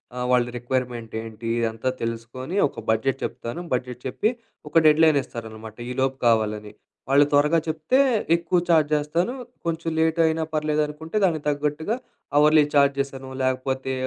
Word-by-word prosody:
ఆహ్, 125 0 -2
వాళ్ళ 125 -1 +4
రిక్వైర్మెంట్ 120 -2 -3
ఏంటి? 115 0 -7
ఇదంతా 115 +2 -1
తెలుసుకొని, 115 +7 -5
ఒక - - -10
బడ్జెట్ 135 +4 +1
చెప్తాను. 120 +9 -6
బడ్జెట్ 125 -1 -5
చెప్పి, 215 - 0 0.4
ఒక 150 - -27
డెడ్లైన్ 155 -1 +5
ఇస్తారనమాట 110 -1 -9
ఈలోపు 130 +1 -1
కావాలని. 105 -2 +1 0.4
వాళ్ళు 140 +2 +6
త్వరగా 150 +3 +4
చెప్తే 155 +10 0 0.4
ఎక్కువ 170 +1 +1
చార్జ్ 155 -3 +4
చేస్తాను, 165 +9 0 0.3
కొంచెం 165 0 -2
లేట్ 160 +1 +2
అయినా 160 0 +1
పర్లేదు 155 0 +1
అనుకుంటే 160 +6 -5
దానికి 160 -5 0
తగ్గట్టుగా 150 +8 -1 0.4
అవర్లీ 150 +1 +6
చార్జెస్ 140 -1 +2
అనో, 130 0 -10
లేకపోతే 130 +1 -1
140 Hz, 140 wpm, -24 LUFS, 120-155 Hz, 0.4 s, వాళ్ళు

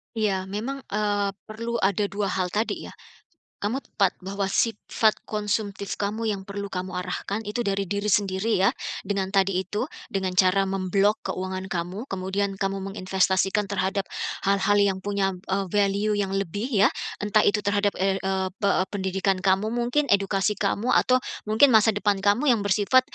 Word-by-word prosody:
Iya. 195 -4 0
Memang, 230 +8 -4
eee, 205 -1 0
perlu 230 +2 -5
ada 200 -2 +1
2 200 -1 -2
hal 185 -1 0
tadi 210 +5 -2
ya. - - -12 0.6
Kamu 235 +7 -2
tepat 195 -5 0
bahwa 195 +1 -2
sifat 220 +2 +1
konsumtif 205 -2 -2
kamu 215 +3 -2
yang 195 -2 -3
perlu 200 0 -5
kamu 185 0 -4
arahkan 190 +3 -3
itu 235 +3 -2
dari 195 -1 0
diri 200 +1 -2
sendiri 200 0 +1
ya, 195 - +5 0.3
dengan 195 -1 -2
tadi 195 -1 +3
itu, 210 +8 -3 0.2
dengan 190 -2 -2
cara 190 +1 +4
mem-block 195 +2 +1
keuangan 185 0 -4
kamu, 180 +5 -3
kemudian 195 -1 -2
kamu 195 0 0
menginvestasikan 190 +1 +1
terhadap 195 0 -1 0.4
hal-hal 200 +1 +3
yang 200 -2 +2
punya, 200 -1 0 0.2
eee, 195 +1 0
value 205 +1 +2
yang 205 -2 0
lebih 200 +4 -2 0.2
ya, - - +3 0.2
entah 210 +1 +2
itu 210 0 +2
terhadap 205 0 +1
er 195 0 +1
eee, 190 0 0
pe 200 - +2 0.2
pendidikan 190 -1 0
kamu 195 +3 +2
mungkin, 245 +5 +1
edukasi 200 +1 +1
kamu 210 +4 0
atau 255 0 +4 0.3
mungkin 240 +4 +5
masa 220 0 +6
depan 205 -2 +1
kamu 230 +8 +3
yang 215 - -1
bersifat 205 +6 +4
200 Hz, 160 wpm, -25 LUFS, 190-210 Hz, 0.6 s, masa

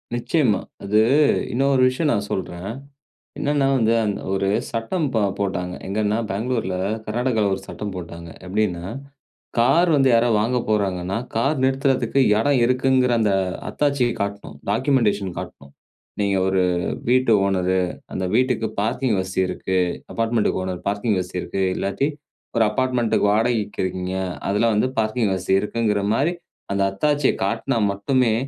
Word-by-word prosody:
நிச்சயமா. 120 -2 +1 0.2
அது 105 +2 +3 0.5
இன்னொரு 135 +1 +2
விஷயம் 145 +4 -1
நான் 105 -4 -1
சொல்றேன். 95 +1 -4 0.7
என்னன்னா, 145 -1 +1
வந்து 115 -3 +2
அந்த 105 - -2
ஒரு 95 0 0 0.2
சட்டம் 120 +9 -1
ப - - +3 0.2
போட்டாங்க. 90 -2 -2
எங்கன்னா, 105 +2 0
பெங்களூர்ல 110 -2 -1 0.3
கர்நாடகால 110 -2 0
ஒரு 95 - -7
சட்டம் 105 -1 -5
போட்டாங்க. 85 -1 -8 0.2
எப்பிடின்னா 90 -3 -1 0.7
கார் 165 +9 +4
வந்து 135 -2 +4
யாரா 120 +1 +4
வாங்க 115 +4 +1
போகிறாங்கன்னா, 95 -3 0 0.2
கார் 135 +7 +1
நிறுத்துறதுக்கு 135 -1 +1 0.2
இடம் 140 +3 +2
இருக்குங்கிற 130 0 +2
அந்த 105 -2 +2 0.4
அத்தாட்சிய 140 -4 +1
காட்ணும். 100 0 -4
டாக்குமெண்டேஷன் 105 -6 +1
காட்ணும். 70 0 -10 0.5
நீங்க 100 -1 +1
ஒரு 95 -1 +2 0.5
வீட்டு 130 -1 +3
ஓனரு. 95 -1 +1 0.4
அந்த 95 - -2
வீட்டுக்கு 125 -2 +1
பார்க்கிங் 120 +2 0
வசதி 95 0 -1
இருக்கு. 95 +1 -2 0.4
அபார்ட்மெண்டுக்கு 115 -4 0
ஓனர் 90 -1 -4
பார்க்கிங் 100 +1 0
வசதி 90 0 -4
இருக்கு. 95 - -2
இல்லாட்டி 100 +8 -1 0.5
ஒரு 115 - +5
அபார்ட்மெண்டுக்கு 125 -3 +1
வாடகைக்கு 110 -1 0
இருக்கீங்க. 95 0 -3 0.3
அதில 105 +4 +2
வந்து 105 +5 +1
பார்க்கிங் 110 -1 +1
வசதி 95 +1 +1
இருக்குங்கிறமாரி 110 - 0 0.4
அந்த 100 0 +1
அத்தாட்சிய 145 +7 +1
காட்னா 115 +5 -1
மட்டுமே 115 +4 +1
110 Hz, 130 wpm, -22 LUFS, 95-125 Hz, 0.7 s, ஒரு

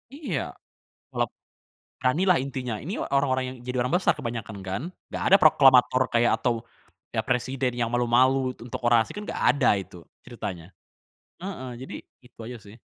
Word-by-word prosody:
Iya, 300 -1 -3 0.7
kalau - - 0
p - - -56 0.6
beranilah 170 +7 +3
intinya. 130 -4 -4
Ini 175 +8 -5 0.2
orang-orang 130 -2 +2
yang 130 - -9
jadi 125 0 -3
orang 125 +6 -1
besar 185 - +3
kebanyakan 115 -3 -5
kan? 95 +6 -3 0.3
Nggak - - -4
ada 195 - +8
proklamator 130 -4 +6
kayak 120 0 +4
atau, 120 -2 +1 0.6
ya - - +1
presiden 130 +1 0
ya 120 - +1
malu-malu 125 +2 +4 0.2
tuk 115 - -11
untuk - - -5
orasi 120 -2 +4
kan 210 - -6
nggak - - -5
ada 140 -3 +3
itu 90 - -13 0.3
ceritanya. 100 -8 -6 0.8
Heeh 170 -10 -6
jadi, 130 - -8 0.3
itu 125 - -22
aja 120 0 -7
sih. 100 - -13
125 Hz, 165 wpm, -26 LUFS, 120-135 Hz, 0.8 s, ada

